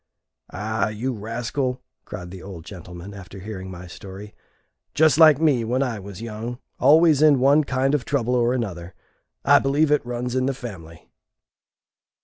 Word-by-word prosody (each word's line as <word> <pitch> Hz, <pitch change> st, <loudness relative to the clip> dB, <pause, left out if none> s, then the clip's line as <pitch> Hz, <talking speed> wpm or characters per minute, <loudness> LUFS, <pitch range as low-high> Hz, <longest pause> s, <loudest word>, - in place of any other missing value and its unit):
"Ah, 110 Hz, +2 st, -2 dB
you 115 Hz, +5 st, -3 dB
rascal!" 120 Hz, +4 st, -3 dB, 0.3 s
cried 90 Hz, -1 st, -8 dB
the 95 Hz, -1 st, -9 dB
old 90 Hz, -4 st, -9 dB
gentleman, 90 Hz, 0 st, -10 dB
after 100 Hz, 0 st, -11 dB
hearing 95 Hz, -1 st, -7 dB
my 90 Hz, -1 st, -9 dB
story. 95 Hz, +3 st, -10 dB, 0.6 s
"Just 155 Hz, -2 st, +4 dB
like 155 Hz, -3 st, +8 dB
me 145 Hz, -7 st, +3 dB
when 125 Hz, +4 st, 0 dB
I 120 Hz, -5 st, -3 dB
was 100 Hz, +2 st, -9 dB
young 115 Hz, +2 st, -5 dB, 0.2 s
always 155 Hz, -1 st, +5 dB
in 150 Hz, -2 st, +6 dB
one 140 Hz, +4 st, +5 dB
kind 135 Hz, 0 st, 0 dB
of 145 Hz, -4 st, +1 dB
trouble 125 Hz, -3 st, -1 dB
or 120 Hz, -1 st, +2 dB
another. 95 Hz, -8 st, -4 dB, 0.5 s
I -, -, +7 dB
believe 145 Hz, +3 st, +1 dB
it 150 Hz, -, +3 dB
runs 120 Hz, 0 st, -4 dB
in 130 Hz, 0 st, +1 dB
the 135 Hz, -, -1 dB
family." 85 Hz, -10 st, -10 dB
120 Hz, 160 wpm, -23 LUFS, 100-135 Hz, 0.6 s, like